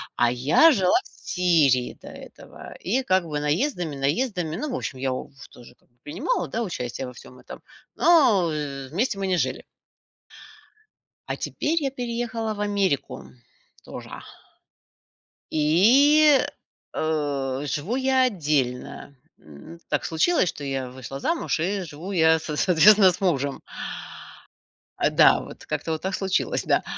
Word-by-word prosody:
А 120 Hz, 0 st, +2 dB
я 145 Hz, -, +5 dB
жила 190 Hz, -, +2 dB
в -, -, -16 dB, 0.2 s
Сирии 155 Hz, -9 st, +2 dB
до -, -, -13 dB
этого, -, -, -12 dB
и 250 Hz, +8 st, -1 dB
как 185 Hz, -7 st, +1 dB
бы 150 Hz, -2 st, -3 dB
наездами, 165 Hz, -, -1 dB
наездами, 165 Hz, -, -1 dB
ну 295 Hz, +9 st, -4 dB
в -, -, -2 dB
общем 130 Hz, -, -5 dB
я 135 Hz, 0 st, -1 dB
ув 130 Hz, -, -7 dB, 0.2 s
тоже, 120 Hz, 0 st, -16 dB
как -, -, -36 dB
бы, 120 Hz, -, -40 dB
принимала, 155 Hz, +3 st, -2 dB
да, 230 Hz, +11 st, -3 dB
участие 130 Hz, -, -5 dB
во -, -, -8 dB
всём 125 Hz, +1 st, -14 dB
этом, -, -, -11 dB, 0.3 s
но, 235 Hz, -, +4 dB
э, 140 Hz, -3 st, -5 dB
вместе 200 Hz, -, -1 dB
мы 195 Hz, -, -2 dB
не 185 Hz, -, +1 dB
жили. -, -, -2 dB, 1.7 s
А -, -, -2 dB
теперь 325 Hz, +2 st, -2 dB
я 275 Hz, -, -1 dB
переехала 235 Hz, -3 st, -3 dB
в -, -, -10 dB
Америку, 200 Hz, -8 st, -1 dB, 0.6 s
тоже. -, -, -9 dB, 1.3 s
И, 265 Hz, -, +5 dB, 0.6 s
э, 145 Hz, -4 st, -2 dB
живу 155 Hz, -, -2 dB
я 265 Hz, 0 st, +2 dB
отдельно. 140 Hz, -, -2 dB, 0.2 s
М, 75 Hz, -, -13 dB
так -, -, -1 dB
случилось, 180 Hz, -, +2 dB
что 145 Hz, -, -7 dB
я 135 Hz, -2 st, -3 dB
вышла 130 Hz, +1 st, -8 dB
замуж 335 Hz, -, -1 dB
и 190 Hz, +5 st, -1 dB
живу 175 Hz, +4 st, -8 dB
я 160 Hz, -2 st, +4 dB
с 155 Hz, -1 st, -6 dB
соответственно, 190 Hz, +4 st, +6 dB
с 180 Hz, +1 st, -7 dB
мужем. 140 Hz, -7 st, -1 dB, 1.4 s
А, -, -, +2 dB
да, -, -, +5 dB
вот, -, -, -12 dB
как-то, 165 Hz, -, -3 dB
вот, 155 Hz, -, -3 dB
так 190 Hz, 0 st, -2 dB
случилось, 190 Hz, -1 st, -1 dB
да. -, -, +1 dB
170 Hz, 145 wpm, -24 LUFS, 140-215 Hz, 1.7 s, соответственно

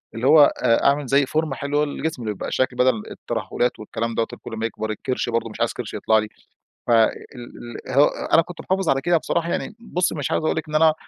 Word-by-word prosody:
اللي 115 Hz, +3 st, -1 dB
هو 155 Hz, +1 st, +8 dB, 0.2 s
آآ 115 Hz, -, +3 dB
أعمل 140 Hz, 0 st, +3 dB
زي 140 Hz, +2 st, +3 dB
فورمة 155 Hz, 0 st, -1 dB
حلوة 145 Hz, +4 st, 0 dB
للجسم 150 Hz, -1 st, -4 dB
اللي 110 Hz, -2 st, -2 dB
يبقى -, -, -6 dB
شكل 130 Hz, -, 0 dB
بدل 125 Hz, -4 st, +2 dB
الترهلات 120 Hz, -2 st, -2 dB
والكلام 115 Hz, +2 st, -4 dB
دوَّة 115 Hz, -, 0 dB
اللي -, -, -9 dB
كل -, -, -9 dB
أما 110 Hz, 0 st, -2 dB
يكبر 110 Hz, -1 st, -4 dB
الكرش 125 Hz, +3 st, -3 dB
برضه، 115 Hz, 0 st, -1 dB
مش -, -, -11 dB
عايز -, -, +1 dB
كرش -, -, -6 dB
يطلع 110 Hz, -, +2 dB
لي. 110 Hz, -, -3 dB, 0.6 s
فال 115 Hz, -2 st, +5 dB, 0.8 s
ال -, -, -5 dB
هو 140 Hz, +2 st, +6 dB
أنا 165 Hz, -, +2 dB
كنت 170 Hz, +1 st, -9 dB
محافظ 190 Hz, -2 st, -1 dB
على 135 Hz, 0 st, +2 dB
كده 175 Hz, +3 st, +3 dB
بصراحة، 170 Hz, +1 st, -1 dB
يعني -, -, -3 dB
بصي 180 Hz, -7 st, -1 dB
مش 145 Hz, -4 st, -3 dB
عايز -, -, 0 dB
أقول -, -, +1 dB
لِك 155 Hz, 0 st, -4 dB
إن 155 Hz, -, -4 dB
أنا 155 Hz, 0 st, +5 dB
135 Hz, 235 wpm, -22 LUFS, 115-155 Hz, 0.8 s, هو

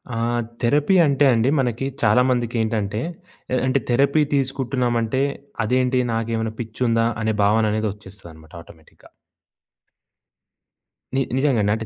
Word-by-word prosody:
ఆహ్, 120 Hz, +1 st, 0 dB, 0.2 s
థెరపీ 145 Hz, +9 st, +2 dB
అంటే 140 Hz, 0 st, +2 dB
అండి. 115 Hz, +2 st, +2 dB
మనకి 125 Hz, 0 st, -1 dB, 0.2 s
చాలా 110 Hz, +2 st, +4 dB
మందికేంటంటే 115 Hz, -2 st, -1 dB
అంటే. 105 Hz, +3 st, -4 dB, 0.5 s
ఆహ్, 130 Hz, -, +1 dB
అంటె 130 Hz, +1 st, +1 dB
థెరపీ 140 Hz, +5 st, +3 dB
తీసుకుంటున్నాం 130 Hz, -2 st, -1 dB
అంటే. 130 Hz, +4 st, 0 dB, 0.4 s
అదేంటి 125 Hz, +2 st, +1 dB
నాకేమైనా 115 Hz, -1 st, -2 dB
పిచ్చుందా. 115 Hz, 0 st, 0 dB
అనే 110 Hz, 0 st, 0 dB
భావన 110 Hz, +2 st, +3 dB
అనేది 110 Hz, 0 st, -1 dB
వచ్చేస్తదన్నమాట 90 Hz, -6 st, -15 dB
ఆటోమేటిక్‌గా. 80 Hz, -1 st, -19 dB, 2.1 s
నీ -, -, +2 dB, 0.2 s
నిజంగా. 135 Hz, -5 st, +2 dB
అంటే 110 Hz, 0 st, -5 dB
115 Hz, 120 wpm, -21 LUFS, 110-130 Hz, 2.1 s, చాలా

